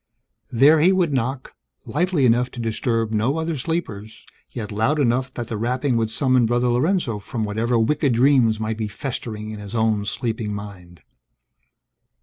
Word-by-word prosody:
There, 140 +6 +5
he 175 +5 +5
would 180 -6 +1
knock; 130 +1 -2 0.3
lightly 170 -2 +1
enough 120 +1 +3
to - - -8
disturb 115 0 -1
no 115 +7 0
other 160 0 -2
sleepers, 125 -9 -5 0.2
yet 110 -4 -6
loud 110 +9 +1
enough 130 0 +1
that 120 -2 -4
the 115 - -4
rapping 125 +4 0
would 115 -1 0
summon 130 0 +2
Brother 120 +1 +1
Lorenzo 125 - 0
from 110 +3 -4
whatever 115 +3 0
wicked 140 +3 +1
dreams 120 -3 +3
might 110 0 -3
be 110 -1 -2
festering 110 -1 -5
in 105 - -7
his 105 +2 -8
own 110 -2 +1
sleeping 110 0 -3
mind. 90 -6 -10
120 Hz, 160 wpm, -22 LUFS, 110-135 Hz, 0.3 s, There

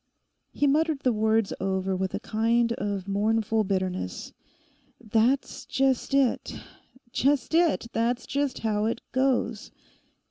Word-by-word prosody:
He 290 - 0
muttered 300 +1 +2
the 250 -3 +2
words 220 -1 +1
over 190 0 -1
with 190 0 -2
a - - -2
kind 230 +2 +1
of 200 -3 -3
mournful 220 +2 +1
bitterness. 185 - -3 0.7
'That's 230 +5 0
just 270 0 +1
it—just 265 +1 -1
it; 330 -6 +3
that's 235 +2 0
just 280 -1 -1
how 210 -1 +1
it 230 +1 -1
goes! 255 -4 0
225 Hz, 115 wpm, -26 LUFS, 205-265 Hz, 0.7 s, it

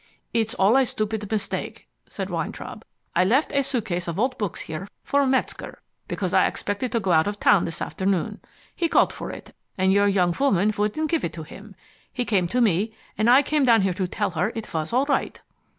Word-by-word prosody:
"It's 225 0 0
all 210 +5 +4
a 270 - +4
stupid 215 -2 -3
mistake," 215 -2 -3 0.2
said - - -5
Weintraub. - - -5 0.3
"I 180 - +4
left 255 +11 +2
a 280 - +3
suitcase 200 -10 -2
of 170 +2 -3
old 255 +3 +1
books 205 -5 -3
here 160 +5 -6 0.2
for 280 -1 +2
Metzger, 260 0 -2 0.3
because - - -3
I - - +5
expected 205 +5 -3
to 230 - +2
go 190 -4 -1
out 160 +1 +4
of 205 0 -3
town 205 -4 +4
this 165 - -4
afternoon. 190 -2 -1 0.4
He 335 - 0
called - - +3
for - - -6
it, - - -10 0.2
and 190 0 +3
your 200 0 +4
young 180 -4 +2
woman 215 -7 +3
wouldn't 215 +10 -1
give 330 - +1
it 165 - -2
to 160 0 -7
him. 195 +5 -12 0.4
He 245 - -2
came 190 -6 +1
to 250 +7 0
me, 215 +1 +1 0.2
and 215 +2 +2
I 260 +4 +7
came 300 0 +1
down 230 -5 +5
here 190 -1 +1
to 185 0 -2
tell 180 - -2
her 175 +6 0
it 225 -1 -6
was 160 +3 -2
all 255 +4 +2
right." 280 -2 -1
210 Hz, 215 wpm, -24 LUFS, 185-250 Hz, 0.4 s, I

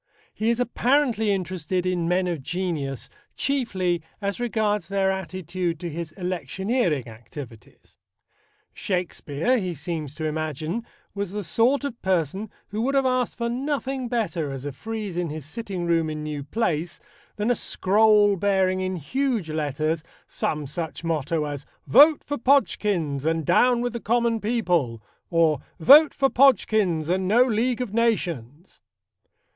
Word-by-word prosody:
He 220 +1 0
is 235 0 +1
apparently 245 -2 +2
interested 185 -1 -2
in 180 -2 0
men 180 +2 +2
of 170 -5 -2
genius 155 -5 -3 0.3
chiefly 190 - 0 0.2
as 200 0 -3
regards 215 -6 0
their 195 -1 +1
attitude 185 -2 -3
to 170 -1 -5
his 165 0 -5
electioneering 180 - -1
activities. 115 +1 -12 0.8
Shakespeare, 180 - -1
he 180 -4 -3
seems 155 -2 -5
to 155 - -4
imagine, 155 - -3 0.3
was 200 -2 -4
the 210 0 -3
sort 245 +10 +2
of 260 -5 -5
person 190 +3 0 0.2
who 210 +2 -3
would 270 +4 0
have 270 -1 +3
asked 255 -2 0
for 235 -1 -1
nothing 265 +1 -2
better 210 - -1
as 135 0 -6
a 145 - -3
frieze 210 +4 -5
in 175 -2 -1
his 155 -2 -6
sitting 190 0 -5
room 165 -2 +1
in 155 0 -4
New 150 -2 -5
Place 170 -2 -1 0.4
than 210 +3 0
a - - +3
scroll 210 0 +3
bearing 190 -1 +1
in 185 0 -2
huge 225 - -1
letters 155 +1 -1 0.2
some 150 -1 -2
such 160 +3 -5
motto 160 -1 -1
as 145 -2 -5 0.2
"Vote 290 - +6
for 290 -2 -4
Podgkins 205 - +1
and 160 0 0
Down 240 - +4
with 245 -1 -2
the 235 - -3
Common 235 0 +1
People" 180 - 0 0.3
or 165 -4 +3 0.2
"Vote 290 - +8
for 275 - +3
Podgkins 215 - +3
and 185 +2 0
No 230 +6 +5
League 245 +1 0
of 230 -5 -4
Nations." 175 - -1
185 Hz, 150 wpm, -24 LUFS, 160-230 Hz, 0.8 s, Vote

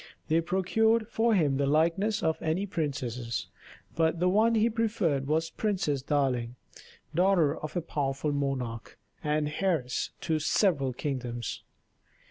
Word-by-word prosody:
They 160 +2 +3
procured 220 +6 +2
for 225 -1 +2
him 145 -7 +2
the 140 0 +1
likenesses 170 +9 +2
of 160 -1 0
many 165 +5 0
princesses, 130 - -3 0.5
but 165 0 +1
the 180 +1 +3
one 220 +4 +3
he 220 +1 +4
preferred 210 - 0
was 160 +2 0
Princess 185 -10 -1
Darling, 130 -4 0 0.6
daughter 175 -3 +3
of 155 - -7
a - - +1
powerful 145 -2 -2
monarch 135 -5 -3 0.3
and 150 0 +1
heiress 160 -10 0
to 160 -2 0
several 150 -4 +2
kingdoms. 125 -3 -4
155 Hz, 130 wpm, -29 LUFS, 135-190 Hz, 0.6 s, he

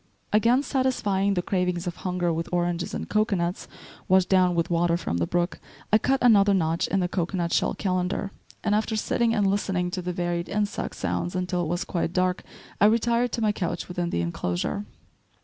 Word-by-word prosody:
Again 235 +5 +4
satisfying 205 -8 +1
the 180 - 0
cravings 180 -2 -1
of 175 -1 -4
hunger 180 -2 -1
with 165 +1 -3
oranges 175 -1 -1
and - - -4
cocoanuts, 195 -5 0 0.4
washed 185 0 +4
down 185 -2 +4
with 170 +1 0
water 170 0 +2
from 85 - -3
the 85 - 0
brook, 175 0 -1 0.3
I 215 - +7
cut 270 +3 +1
another 205 -4 +6
notch 165 -2 +1
in 195 - 0
the 180 - +1
cocoanut 175 -1 -2
shell - - +1
calendar, 185 +1 -1 0.3
and 210 - +1
after 220 +1 0
sitting 230 +2 +1
and 205 -2 +2
listening 195 -2 0
to 185 0 -3
the 180 0 -3
varied 175 -1 -2
insect 205 0 -2
sounds 175 - -2
until 180 -1 -1
it 170 - -2
was 175 +4 -1
quite 170 -1 -2
dark, 185 0 +1 0.4
I - - +7
retired, 235 +2 +2
to 235 - -1
my 215 - +3
couch 175 -4 -3
within 175 -1 -2
the 85 - -1
inclosure. 90 - -2
180 Hz, 190 wpm, -25 LUFS, 175-205 Hz, 0.4 s, I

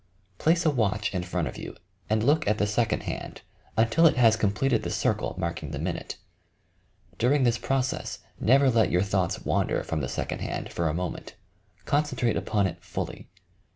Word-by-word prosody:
Place 170 +2 +2
a 155 - +5
watch 105 -6 0
in 90 - -1
front 90 -1 -2
of - - -7
you, - - -7 0.3
and 110 0 +2
look 150 +2 +3
at 105 +1 +2
the 105 - +2
second 105 +2 0
hand - - -6 0.3
until 115 +10 +5
it 150 - +2
has 115 -3 +6
completed 110 +4 +1
the - - -4
circle - - 0
marking 85 -4 -3
the 75 - -4
minute. 85 +4 -4 1.0
During 135 +4 +3
this 120 -1 +2
process 130 -1 -1 0.2
never 135 +3 +5
let 115 -2 +3
your 90 +2 +2
thoughts 95 -3 -1
wander - - +1
from 80 -2 -2
the 60 - -3
second - - -3
hand - - -4
for 85 -2 0
a - - -1
moment. 90 +1 -5 0.5
Concen 145 -3 0
trate 120 -3 +1
upon 105 -2 +1
it 85 - -4
fully. - - -5
110 Hz, 185 wpm, -27 LUFS, 90-130 Hz, 1.0 s, has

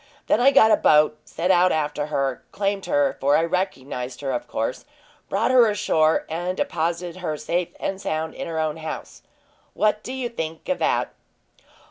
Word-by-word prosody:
Then - - +2
I 265 - +7
got 220 -5 +6
a - - +6
boat, 150 0 +4
set 180 +3 -1
out 180 0 +4
after 150 -1 -1
her, 135 -4 -1
claimed 200 -1 -2
her 145 -1 +1
for 140 +2 +4
I 165 - +2
recognized 135 -8 -3
her, 135 -2 -2
of 125 - -3
course 115 +3 -3 0.5
brought 205 +6 +1
her 245 -3 +6
ashore, 160 -6 +2
and 175 +3 -3
deposited 170 +1 -2
her 155 -4 -3
safe 175 +3 -2
and 195 0 -3
sound 160 -2 -2
in - - -6
her 165 -1 -4
own 155 0 -1
house. 160 0 -7 0.5
What 215 0 +1
do 255 - -7
you 260 -2 -3
think 165 -9 -6
of 275 - 0
that?" - - 0
165 Hz, 180 wpm, -23 LUFS, 150-195 Hz, 0.5 s, I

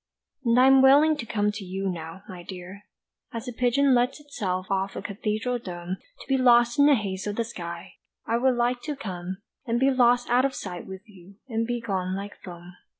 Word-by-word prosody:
And 235 0 +3
I 255 - +7
am 270 0 +7
willing 290 +4 +6
to 235 -5 -6
come 210 -1 +1
to 205 -1 -7
you 190 +1 -4
now, 170 +1 -6
my 185 -3 -9
dear, 185 +2 -10 0.5
As 230 +2 -6
a 250 - -4
pigeon 255 +3 +3
lets 245 +4 +2
itself 200 -11 -3
off 195 0 0
from - - -5
a - - -23
cathedral 215 +4 -2
dome 180 -3 -6 0.2
To - - -12
be 270 - +2
lost 240 +1 +5
in 285 - +7
the 290 - +6
haze 195 -4 -3
of 205 - -2
the 230 - 0
sky, 170 -5 -8 0.3
I 230 - +1
would 255 +1 +2
like 240 +1 0
to 300 -1 -3
come, 185 -4 -6 0.2
And 235 0 +1
be 270 +1 +4
lost 245 -1 +3
out 250 +1 +4
of 275 -1 0
sight 180 -3 -6
with 190 +2 -9
you, 195 -2 -16
and 230 -2 -1
be 240 0 -1
gone 190 -4 -2
like 200 +1 -6
foam. 175 -1 -10
220 Hz, 220 wpm, -26 LUFS, 190-250 Hz, 0.5 s, I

